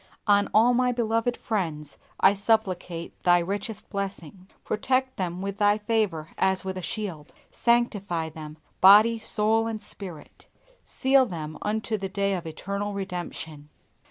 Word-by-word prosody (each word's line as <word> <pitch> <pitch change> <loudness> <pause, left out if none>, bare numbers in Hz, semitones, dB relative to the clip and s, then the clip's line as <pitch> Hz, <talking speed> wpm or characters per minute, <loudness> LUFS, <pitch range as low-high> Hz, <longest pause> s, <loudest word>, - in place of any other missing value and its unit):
On 205 -1 +3
all 230 +3 +5
my 250 0 +2
beloved 235 0 0
friends 160 -9 -3 0.2
I 190 - +6
supplicate 190 -5 -1
Thy 175 0 +5
richest 200 +5 -4
blessing. 190 -2 -5 0.2
Protect 260 +4 0
them 180 0 -3
with 200 0 -4
Thy 205 0 +4
favor 210 -8 -1
as 190 0 +2
with 190 0 -3
a 185 - -5
shield. 180 -7 -5 0.2
Sanctify 205 -9 0
them, 155 -1 -10 0.2
body, 215 +4 +7
soul, 220 +1 +1
and 225 -1 -3
spirit. 185 -7 -9 0.4
Seal 265 -1 +3
them 155 -5 -6
unto 215 +1 -2
the 195 0 -4
day 200 +1 0
of 175 -3 -4
eternal 200 +5 -4
redemption. 175 -6 -6
200 Hz, 140 wpm, -26 LUFS, 175-220 Hz, 0.4 s, body